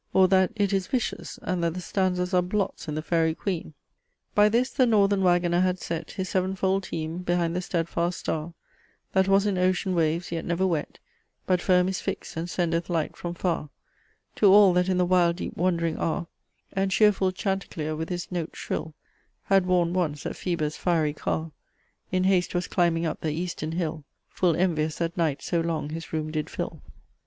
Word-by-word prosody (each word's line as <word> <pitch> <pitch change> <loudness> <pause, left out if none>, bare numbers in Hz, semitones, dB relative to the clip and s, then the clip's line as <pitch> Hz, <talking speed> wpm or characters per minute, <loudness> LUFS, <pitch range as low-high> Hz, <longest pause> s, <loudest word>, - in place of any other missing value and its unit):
Or 190 -1 +6
that 190 -1 +4
it 205 -2 +1
is 190 -2 0
vicious, 250 -3 -3
and 180 -2 -1
that 165 0 0
the - - -3
stanzas 180 0 -1
are 180 - +5
blots 190 +1 -2
in 150 - -3
THE 155 - -3
FAERY 165 -1 +1
QUEEN? 170 -6 -4 0.6
"By 210 0 +5
this 240 +4 +1
the 255 - +3
northern 200 -3 +3
wagoner 175 -1 +3
had 185 0 +1
set 165 -2 -4
His 190 -1 -4
sevenfold 190 +1 0
teme 160 +1 -4
behind 175 -1 0
the 180 - 0
stedfast 170 0 -1
starre, 160 +2 -3 0.6
That 190 0 +3
was 195 +1 +4
in 195 -3 0
ocean 185 +1 +1
waves 165 0 0
yet 165 -1 -2
never 175 +2 0
wet, 165 -5 -2 0.5
But 180 -1 +2
firme 180 -1 +3
is 190 0 -2
fixt - - -5
and 165 +2 -3
sendeth 170 -1 -1
light 165 -3 -1
from 175 0 -5
farre 170 -4 -1 0.7
To 210 - +5
all 200 -2 +7
that 180 +1 +2
in 185 - +2
the 180 - +3
wild 175 -1 +3
deep 185 - -5
wandering 170 -2 0
arre 165 +1 -1 0.5
And 195 0 +1
chearfull 195 -1 +3
chaunticlere 185 -5 -3
with 160 +1 -4
his 175 0 -4
note 170 -3 -3
shrill 160 -1 -4 0.5
Had 195 -2 +3
warned 175 -2 +2
once 160 -5 -1
that - - -4
Phoebus' 155 -4 -2
fiery 160 -4 +1
carre 160 +1 -3 0.6
In 185 -1 +1
hast 185 -2 +2
was 175 - 0
climbing 170 -2 +1
up 160 - -3
the 155 - -1
easterne 165 -1 -3
hill, 165 -3 -2 0.3
Full 175 -4 +1
envious 160 -3 +1
that 170 0 -2
night 155 -5 0
so 170 -2 0
long 160 -3 -2
his 165 +1 -6
roome 155 -1 -2
did 155 -1 -2
fill." - - -5
175 Hz, 190 wpm, -26 LUFS, 165-185 Hz, 0.7 s, all